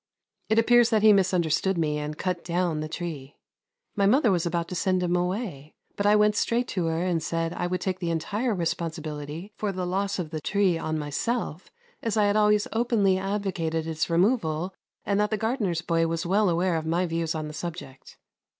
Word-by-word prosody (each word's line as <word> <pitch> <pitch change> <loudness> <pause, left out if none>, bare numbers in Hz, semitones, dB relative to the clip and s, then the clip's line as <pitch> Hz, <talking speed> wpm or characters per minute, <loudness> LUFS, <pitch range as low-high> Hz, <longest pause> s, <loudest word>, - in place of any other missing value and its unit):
It 220 - +2
appears 240 +1 +5
that 220 -3 +2
he 215 -1 +8
misunderstood 185 -1 +2
me 150 -2 0
and 150 +1 -5
cut 180 -2 -2
down 175 -2 0
the 155 0 -4
tree. 155 -6 -6 0.6
My 200 -2 +3
mother 245 +1 +4
was 175 -2 +1
about 170 0 -1
to 180 - -5
send 185 0 +1
him 175 0 +1
away, 180 - -3 0.2
but 205 - 0
I 210 - +6
went 210 0 +4
straight 240 +3 +1
to 180 -4 -1
her 165 +1 0
and 175 -3 0
said 165 +1 -2
I 175 - -2
would 180 0 -2
take 185 -1 -2
the 175 -2 -2
entire 205 +8 -1
responsibility 160 +1 -4
for 210 -2 -1
the 185 -1 -3
loss 195 +2 -1
of 170 -4 -4
the 155 -1 -4
tree 195 0 +2
on 155 -1 -2
myself, 155 - -3 0.3
as 225 -1 -1
I 210 - +4
had 205 0 +2
always 210 -1 +3
openly 220 -5 +2
advocated 190 -5 -2
its 160 0 -2
removal 175 -2 +1 0.3
and 200 0 +1
that 210 0 +2
the 215 - 0
gardener's 210 -7 -1
boy 165 -1 +1
was 165 +1 -2
well 195 +3 +3
aware 175 0 +1
of 160 0 -4
my 170 +3 +1
views 165 -1 -2
on 155 -1 -3
the 150 - -8
subject. 155 -4 -8
180 Hz, 205 wpm, -26 LUFS, 165-205 Hz, 0.6 s, he